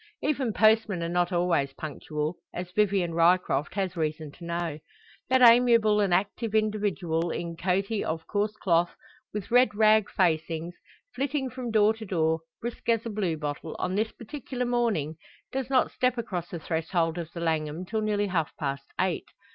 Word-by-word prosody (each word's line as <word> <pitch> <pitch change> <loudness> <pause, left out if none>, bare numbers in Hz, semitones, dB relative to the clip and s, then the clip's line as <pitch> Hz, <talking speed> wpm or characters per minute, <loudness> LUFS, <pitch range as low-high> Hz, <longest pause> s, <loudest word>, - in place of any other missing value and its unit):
Even 275 -6 0
postmen 215 -4 +3
are - - -1
not 175 +1 +1
always 175 -6 +1
punctual, 150 +2 -4 0.2
as 180 0 -5
Vivian 195 -4 +1
Ryecroft 170 -1 +2
has 190 -3 -1
reason 155 -2 -2
to 170 - -15
know. 170 -3 -3 0.5
That 260 0 +4
amiable 230 -3 +6
and 200 -3 +1
active 205 +4 0
individual 200 -6 0
in 170 0 -4
coatee 195 +5 0
of 160 0 -3
coarse 210 +1 -1
cloth, 175 -4 +1 0.4
with 210 -1 -5
red 245 -2 +5
rag 215 -1 +4
facings, 165 -1 0 0.4
flitting 270 -1 -2
from 250 -1 -5
door 215 -1 +4
to 220 0 -9
door, 160 -3 +1 0.2
brisk 235 0 -5
as 230 -1 +2
a 230 - -3
blue 190 -6 -1
bottle, 150 +1 -5
on 185 - -2
this 215 +3 0
particular 250 +1 -5
morning 225 -11 0 0.3
does 265 -1 -3
not 260 -2 +3
step 255 0 +1
across 185 -7 -4
the 175 - -5
threshold 165 +1 -1
of 165 -1 -6
the 170 - -6
Langham 160 0 -1
till 220 +4 -2
nearly 210 -1 +1
half 175 -5 -2
past 140 -2 -3
eight. 185 -2 0
185 Hz, 170 wpm, -27 LUFS, 165-220 Hz, 0.5 s, amiable